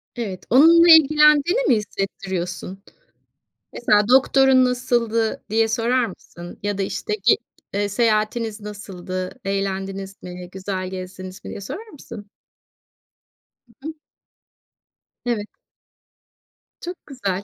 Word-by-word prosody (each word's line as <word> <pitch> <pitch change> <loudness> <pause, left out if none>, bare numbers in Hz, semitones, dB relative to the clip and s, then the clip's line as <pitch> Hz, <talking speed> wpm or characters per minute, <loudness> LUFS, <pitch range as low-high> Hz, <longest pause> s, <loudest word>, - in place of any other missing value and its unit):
Evet. 205 -7 -5
Onunla 330 +7 +7
ilgilendiğini 300 - +5
mi - - +5
hissettiriyorsun? 190 -2 -4 0.9
Mesela 210 -3 +2
"Doktorun 265 0 +5
nasıldı?" 240 -3 0
diye 225 +1 +2
sorar 235 +3 +1
mısın 175 -3 -11
ya 205 -1 -2
da - - 0
işte 195 - -4
"Ge - - +5 0.4
eee 205 0 0
seyahatiniz 220 0 0
nasıldı, 185 -3 -6
eğlendiniz 195 0 -4
mi, 180 0 -8
güzel 190 0 -4
gezdiniz 185 0 -8
mi?" - - -7
diye - - -7
sorar 390 - -7
mısın? 225 - -11 1.5
Hı 295 - -7
hı. 320 - -5 1.3
Evet. 225 -4 -2 1.3
Çok 355 +1 -6
güzel. 200 -9 -3
210 Hz, 105 wpm, -22 LUFS, 190-250 Hz, 1.5 s, Onunla